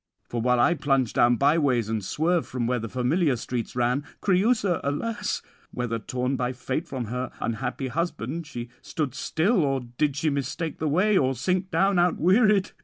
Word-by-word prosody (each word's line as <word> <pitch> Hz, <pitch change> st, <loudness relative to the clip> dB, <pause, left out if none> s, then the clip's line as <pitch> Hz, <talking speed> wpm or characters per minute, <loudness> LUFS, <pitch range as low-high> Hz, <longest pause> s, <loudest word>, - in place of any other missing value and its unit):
For 120 Hz, -, -3 dB
while 125 Hz, +1 st, +2 dB
I 170 Hz, -, +5 dB
plunge 135 Hz, -6 st, +1 dB
down 120 Hz, 0 st, +4 dB
byways, 140 Hz, -4 st, +2 dB
and 110 Hz, -2 st, -2 dB
swerve 165 Hz, -, 0 dB
from 125 Hz, -2 st, -2 dB
where 125 Hz, +1 st, 0 dB
the 115 Hz, 0 st, -5 dB
familiar 130 Hz, -, +1 dB
streets 120 Hz, 0 st, -4 dB
ran, 125 Hz, +3 st, +1 dB, 0.2 s
Creüsa, 200 Hz, -1 st, +2 dB
alas! 205 Hz, +9 st, -2 dB, 0.3 s
whether, 120 Hz, -2 st, -3 dB
torn 125 Hz, +4 st, -2 dB
by 125 Hz, 0 st, -1 dB
fate 130 Hz, +6 st, -3 dB
from 130 Hz, -5 st, -4 dB
her 125 Hz, +3 st, -3 dB
unhappy 125 Hz, +3 st, -3 dB
husband, 160 Hz, 0 st, -3 dB
she 120 Hz, -4 st, -6 dB
stood 145 Hz, -6 st, -3 dB
still, 170 Hz, -, +1 dB
or 135 Hz, -2 st, 0 dB, 0.2 s
did 150 Hz, -3 st, +2 dB
she 155 Hz, +1 st, 0 dB
mistake 140 Hz, +4 st, -3 dB
the 155 Hz, -, -1 dB
way, 190 Hz, +6 st, +3 dB
or 130 Hz, 0 st, +1 dB
sink 185 Hz, -, -1 dB
down 195 Hz, 0 st, +2 dB
outwearied? 190 Hz, +4 st, +3 dB
140 Hz, 175 wpm, -26 LUFS, 125-175 Hz, 0.3 s, I